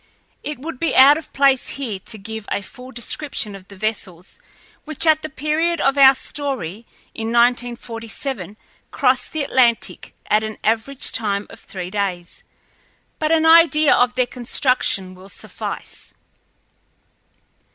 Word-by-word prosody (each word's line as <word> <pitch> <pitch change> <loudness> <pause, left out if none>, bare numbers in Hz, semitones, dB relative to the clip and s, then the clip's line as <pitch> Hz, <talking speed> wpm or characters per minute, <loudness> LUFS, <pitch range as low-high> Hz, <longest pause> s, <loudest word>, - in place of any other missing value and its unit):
It 300 - -5
would 275 0 -7
be 330 - 0
out 280 +4 +7
of 320 - -14
place 275 -2 +3
here 230 -8 -4
to 220 - -8
give 220 +1 -8
a 200 - -1
full 255 +5 -11
description 240 -2 -2
of 195 -1 -12
the 200 - -13
vessels 190 -4 -5 0.4
which 310 +1 +1
at 315 -1 +4
the 310 - -5
period 305 +4 -1
of 275 0 +2
our 270 -1 +7
story, 235 - -5 0.3
in 225 - -5
1947, 235 -1 -1 0.3
crossed - - +1
the 310 -2 -2
Atlantic 240 -4 +1
at 210 +1 +3
an 220 0 -5
average 230 +5 +1
time 205 -2 -1
of - - -12
three 185 -2 -7
days, 190 -4 -3 0.8
but 310 0 0
an 320 -1 +3
idea 320 -2 +6
of 245 0 +2
their 255 - +2
construction 245 -6 0
will 185 +1 -14
suffice. - - -7
245 Hz, 140 wpm, -20 LUFS, 210-285 Hz, 0.8 s, out